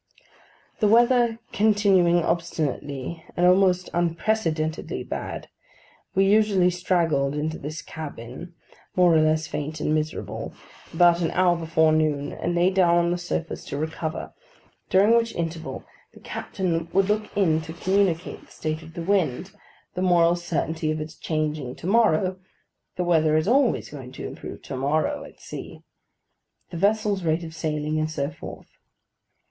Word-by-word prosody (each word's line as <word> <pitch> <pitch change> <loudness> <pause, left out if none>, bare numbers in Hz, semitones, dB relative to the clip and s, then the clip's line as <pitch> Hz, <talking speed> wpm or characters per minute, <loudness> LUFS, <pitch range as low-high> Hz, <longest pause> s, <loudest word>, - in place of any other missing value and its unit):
The 210 - +3
weather 235 +1 +4
continuing 195 -5 +3
obstinately 160 -2 -2
and 175 - +3
almost 185 0 +4
unprecedentedly 165 -2 -1
bad, - - -5 0.7
we 195 +1 +4
usually 200 -3 +4
straggled 165 -6 +1
into 155 +2 -2
this 155 +2 -6
cabin, 155 +2 -8 0.4
more 180 -2 +5
or 160 - +5
less 155 0 +2
faint 150 +1 -4
and 150 - 0
miserable, 155 0 -3 0.4
about 175 +1 +4
an 165 - +1
hour 180 -1 +3
before 160 -1 +2
noon, 155 -2 +1
and 175 - -2
lay 175 +2 +3
down 180 -3 +4
on 170 0 +2
the 175 - 0
sofas 170 -1 -4
to 140 - -5
recover; 160 +1 -4 0.6
during 205 +5 +5
which 230 -1 +1
interval, 165 -1 -4 0.3
the - - -13
captain 170 -4 -3
would 195 0 +3
look 210 +1 0
in 160 -5 +3
to 160 - -8
communicate 180 0 0
the - - -22
state 155 0 -4
of 160 +1 -13
the 170 - -4
wind, 185 -2 0 0.4
the 180 - -3
moral 175 -2 +4
certainty 160 -2 -2
of 155 0 -1
its 155 +1 -6
changing 150 -4 -2
to - - -11
morrow 190 -3 +2 0.6
(the 180 - -1
weather 160 -3 +3
is 155 - 0
always 260 +2 +2
going 135 -4 -9
to - - -7
improve - - -8
to 140 - -6
morrow, 155 - 0
at - - -15
sea), - - -9 0.9
the 170 - -5
vessel's 205 +1 +1
rate 165 0 0
of 160 -1 -8
sailing, 155 -1 -2
and 155 0 0
so 145 -1 -2
forth. - - -10
170 Hz, 155 wpm, -24 LUFS, 155-185 Hz, 0.9 s, more